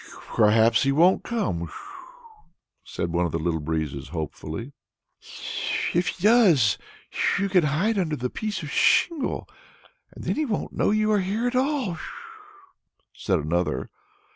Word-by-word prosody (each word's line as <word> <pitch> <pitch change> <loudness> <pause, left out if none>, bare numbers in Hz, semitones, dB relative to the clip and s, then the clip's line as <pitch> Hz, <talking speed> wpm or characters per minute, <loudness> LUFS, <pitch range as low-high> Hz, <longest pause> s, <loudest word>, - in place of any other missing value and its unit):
"Perhaps 110 +1 +4
he 135 - +2
won't 170 +7 +4
come," 90 - -2 1.1
said 85 -1 -4
one 85 0 +2
of - - -7
the 80 - -1
Little 80 0 -1
Breezes 75 -3 -3
hopefully. 80 - -6 1.2
"If 175 +1 +1
he 180 - -4
does 195 - +5 0.3
come, 200 - 0
you 200 - 0
can 180 -4 +3
hide 190 +10 +1
under 160 -5 0
the 125 -2 -3
piece 215 -5 -4
of 150 - -6
shingle, 305 -1 +2 0.6
and - - -11
then - - -1
he 310 - +1
won't 220 -7 -3
know - - +1
you 215 +1 +2
are 210 - +3
here 205 +6 -2
at 245 +1 -1
all," 255 - 0 1.1
said 95 -3 0
another. 75 -3 -1
150 Hz, 145 wpm, -25 LUFS, -, 1.2 s, does